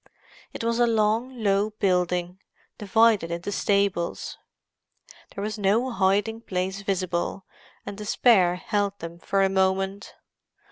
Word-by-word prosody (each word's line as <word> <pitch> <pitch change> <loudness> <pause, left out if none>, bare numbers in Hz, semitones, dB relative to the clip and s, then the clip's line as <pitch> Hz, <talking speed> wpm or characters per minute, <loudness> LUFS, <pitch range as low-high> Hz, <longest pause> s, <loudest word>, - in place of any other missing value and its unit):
It - - -7
was 230 +1 0
a 240 - +4
long, 225 +2 0
low 200 +1 +2
building, 180 -3 -1 0.4
divided 215 -3 +3
into 170 +4 -4
stables. 200 -4 0 1.0
There 200 - -4
was 215 +1 -4
no 220 +6 +1
hiding 205 +2 +1
place 190 -1 -3
visible, 185 -1 -2 0.4
and 200 - -7
despair 205 -4 +3
held 200 +1 -2
them 170 -1 -8
for 195 +2 +1
a - - +4
moment. 190 +1 -1
200 Hz, 125 wpm, -25 LUFS, 185-215 Hz, 1.0 s, a